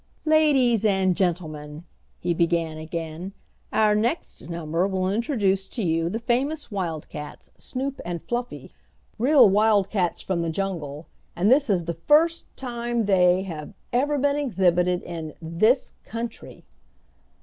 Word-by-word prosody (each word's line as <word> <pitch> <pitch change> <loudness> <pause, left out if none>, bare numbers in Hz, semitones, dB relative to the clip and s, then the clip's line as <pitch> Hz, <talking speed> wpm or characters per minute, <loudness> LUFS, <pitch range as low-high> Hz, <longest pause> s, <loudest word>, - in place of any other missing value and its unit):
"Ladies 280 -8 +4
and 190 -3 +2
gentlemen," 155 -4 -2 0.4
he 175 0 0
began 165 -2 0
again, 165 +3 -6 0.4
"our 215 -1 +3
next 220 - -2
number 170 +1 -1
will 190 -1 -1
introduce 200 -3 0
to 230 - -4
you 165 -1 +1
the 220 - -2
famous 260 +5 -1
wildcats, 160 -6 -5
Snoop 270 +1 -4
and 175 -1 -4
Fluffy. 240 +6 -5 0.5
Real 275 +3 +6
wildcats 200 -3 +2
from 185 -3 -2
the 165 - -1
jungle, 160 -5 -4 0.3
and 195 +6 +2
this 275 -1 +4
is 180 -4 +1
the 170 - -2
first 310 - +2
time 240 -2 -2
they 185 -1 +4
have 165 0 -7 0.2
ever 290 +4 +2
been 285 +1 +1
exhibited 180 -9 +1
in 165 -3 -6
this 200 - +1
country!" 230 0 -7
195 Hz, 130 wpm, -24 LUFS, 170-240 Hz, 0.5 s, Real